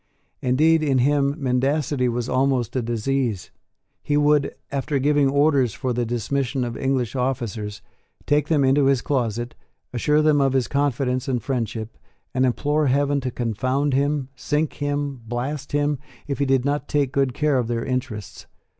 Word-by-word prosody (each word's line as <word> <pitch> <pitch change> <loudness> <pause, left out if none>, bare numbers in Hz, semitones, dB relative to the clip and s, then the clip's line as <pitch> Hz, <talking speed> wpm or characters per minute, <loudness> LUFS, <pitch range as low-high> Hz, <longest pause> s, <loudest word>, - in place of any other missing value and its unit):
Indeed 155 +6 +3
in 140 -4 +2
him 140 +2 +2
mendacity 135 0 0
was 120 0 -2
almost 130 -2 +1
a 130 - +1
disease. 120 -2 -1 0.5
He 145 - 0
would, 150 -1 +2 0.2
after 140 +1 -1
giving 145 0 +3
orders 140 -4 +2
for 130 -2 -2
the 120 -1 -1
dismission 125 +3 -1
of 120 -1 -4
English 130 -3 -1
officers, 115 -5 -3 0.4
take 145 0 +2
them 150 -4 +2
into 135 +1 +4
his 135 -3 +2
closet, 120 -3 -1 0.4
assure 150 +5 +2
them 150 -2 +4
of 135 -1 +2
his 130 -2 +1
confidence 135 -2 0
and 130 -2 0
friendship, 115 -4 -3 0.3
and 130 +1 +2
implore 145 +4 +1
heaven 140 +1 +2
to 130 - -2
confound 130 +4 -1
him, 140 0 0
sink 150 +4 -1
him, 145 -2 -2
blast 135 +5 -4
him, 145 -1 +1 0.3
if 140 -1 -4
he 140 - +2
did 135 -1 +2
not 145 0 -1
take 140 -3 +1
good 135 -3 0
care 150 -3 +2
of 120 - -1
their 115 -1 -2
interests. 115 -6 -4
135 Hz, 165 wpm, -23 LUFS, 125-145 Hz, 0.5 s, into